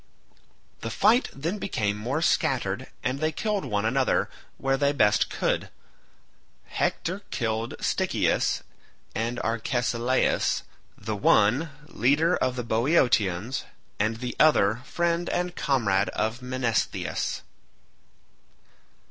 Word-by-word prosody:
The 115 - -4
fight 220 - +3
then 165 +9 -3
became 105 - -1
more 125 +10 -2
scattered - - +1 0.2
and 130 +2 -1
they 155 +1 +1
killed 210 +4 -2
one 105 0 -1
another 130 +3 +1 0.3
where 135 0 +1
they 140 +1 +2
best 105 -7 +3
could. - - -1 1.0
Hector 185 +4 -2
killed 115 -2 -2
Stichius - - +1 0.5
and 115 +3 -2
Arcesilaus, 120 +2 0 0.3
the 110 +1 -4
one, 105 +9 +3 0.2
leader 150 +7 +2
of 125 - 0
the 125 - -3
Boeotians, 115 - +1 0.3
and 110 +2 +1
the 125 0 -5
other, 120 -7 +4
friend 170 0 0
and 180 0 -1
comrade 105 -8 +1
of 110 +3 -2
Menestheus. 125 -3 -1
125 Hz, 105 wpm, -26 LUFS, 110-155 Hz, 1.0 s, other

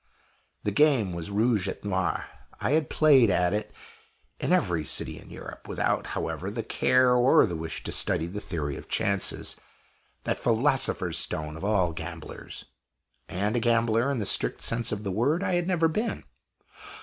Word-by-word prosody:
The 105 - 0
game 125 - +3
was 85 +2 -4
Rouge 105 -1 +1
et 95 - -6
Noir. 95 -5 -1 0.3
I - - -1
had 155 0 +2
played 140 -7 +5
at 90 0 +2
it 105 0 -2 0.7
in - - -1
every 85 -3 +2
city - - -2
in - - -15
Europe, - - -10
without, - - -1
however, 95 - -3
the 115 +2 -4
care 125 +2 +3
or 125 +2 +5
the 90 -5 -4
wish 80 0 -5
to - - -4
study 80 - +1
the 95 +5 -5
Theory 75 -8 -4
of - - -11
Chances 100 -1 0 0.7
that - - -1
philosopher's 130 +4 +1
stone 75 0 -2
of 80 - -9
all 95 -5 +2
gamblers! 85 0 -8 0.6
And 100 +4 -1
a - - +2
gambler, 115 +1 +2
in 140 - -1
the 105 - -2
strict - - 0
sense 115 0 +1
of 105 0 -3
the 100 - -2
word, 140 - +1
I 185 -2 0
had 175 0 +1
never 170 -3 +3
been. 215 +8 -2
105 Hz, 175 wpm, -27 LUFS, 90-130 Hz, 0.7 s, played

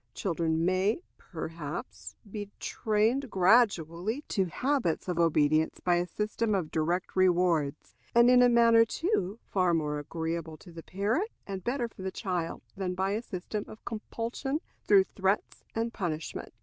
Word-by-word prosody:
Children 165 -3 0
may, 190 - +1 0.2
perhaps, 165 - -7 0.2
be 205 -1 -5
trained 230 +5 0
gradually 195 - +2
to 195 -3 +1
habits 240 - -1
of 175 -2 -1
obedience 155 -1 +3
by 175 -1 +2
a 175 +1 0
system 215 +2 -1
of 175 -5 -2
direct 170 +3 -1
rewards, 175 -5 +2 0.2
and 235 0 +7
in 250 0 +7
a 245 - +6
manner, 230 -1 +6
too, 225 - -1
far 185 -3 +2
more 150 -2 -1
agreeable 160 +1 -4
to 175 - -14
the 165 0 -9
parent 215 - -1 0.2
and 195 -2 -5
better 245 0 -1
for 215 - -13
the 190 - -2
child 180 -5 -3
than 185 -2 -2
by 190 +1 0
a 215 +2 -1
system 205 -1 -5
of 215 - -13
compulsion 235 +5 -3 0.3
through 195 -2 +7
threats 190 +1 -1
and 230 +1 -1
punishment. 165 -5 -4
190 Hz, 150 wpm, -29 LUFS, 170-230 Hz, 0.3 s, and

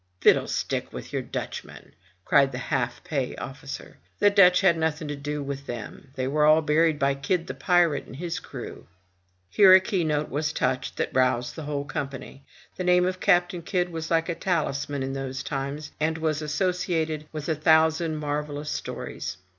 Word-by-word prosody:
"Fiddlestick - - +2
with - - -8
your - - 0
Dutchmen - - -7 0.2
!'* 95 -1 -37
cried 140 -1 +4
the 125 - -5
half 125 -1 -2
pay 135 -5 -2
officer. 135 +1 -8 0.2
"The 205 0 +4
Dutch 185 -3 +6
had 190 -4 +5
nothing 160 -1 -1
to 145 - -3
do 145 +1 -4
with 140 0 -6
them. 120 +3 -7
They 130 -1 -2
were 150 +2 +1
all 155 +1 +6
buried 155 +1 +3
by 140 0 +2
Kidd 165 +5 -1
the - - -5
pirate, 175 -5 +2
and - - -10
his 170 +3 -4
crew." - - -9 0.6
Here 190 - +7
a - - +8
key 190 -1 -1
note 150 -1 0
was 150 +2 -1
touched 130 +1 -1
that - - -2
roused 125 -1 +1
the 160 - -6
whole 145 -1 -3
company. 135 0 -6 0.3
The 185 - -2
name 180 0 +4
of 185 0 -2
Captain 175 0 +2
Kidd 180 +1 -1
was 160 -1 -5
like 165 -1 +2
a 170 - -1
talisman 145 -6 -1
in 135 0 -3
those 135 -1 -4
times, 140 +2 -4
and 160 +1 0
was 155 -1 -1
associated 160 -1 -1
with 155 -2 -6
a 160 - +2
thousand 160 +1 +3
marvellous 150 0 -3
stories. - - -5
150 Hz, 185 wpm, -26 LUFS, 140-165 Hz, 0.6 s, a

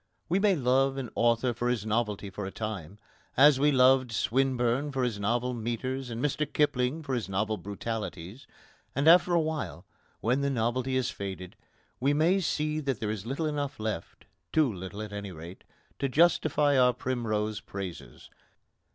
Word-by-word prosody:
We 180 +4 +2
may 200 -1 +4
love 135 0 +2
an 130 -4 -5
author 120 +1 +2
for 120 +2 -1
his 115 -4 -1
novelty 105 -3 -1
for 95 +1 -5
a - - -6
time, 100 -5 -5 0.4
as 140 0 +7
we 145 +1 +4
loved 130 -1 +4
Swinburne 130 +3 +1
for 130 -1 -1
his 115 -5 -1
novel 120 +5 0
metres 120 +3 -3
and 115 -1 -5
Mr 150 +1 -1
Kipling 145 +1 +1
for 135 - -3
his 120 -6 -2
novel 105 +3 0
brutalities; 100 +1 -6 0.5
and 140 +3 +1
after 175 +2 +7
a - - +5
while, 155 -1 -3 0.3
when 125 +5 +1
the 140 - +1
novelty 130 +1 0
has 130 -1 0
faded, 95 -2 -6 0.4
we 140 +3 +2
may 170 +6 +3
see 155 -3 -1
that 135 -7 -2
there 105 -1 -2
is 110 0 -5
little 140 +6 -2
enough 145 -4 -3
left 110 -6 -5 0.3
too 150 -7 +3
little, 95 +3 -6
at 105 -1 -8
any 100 -1 -5
rate, 85 +2 -10 0.4
to 140 - 0
justify 150 -2 +3
our 125 -1 +5
primrose 110 -4 -2
praises. 95 -3 -8
125 Hz, 170 wpm, -29 LUFS, 105-140 Hz, 0.5 s, as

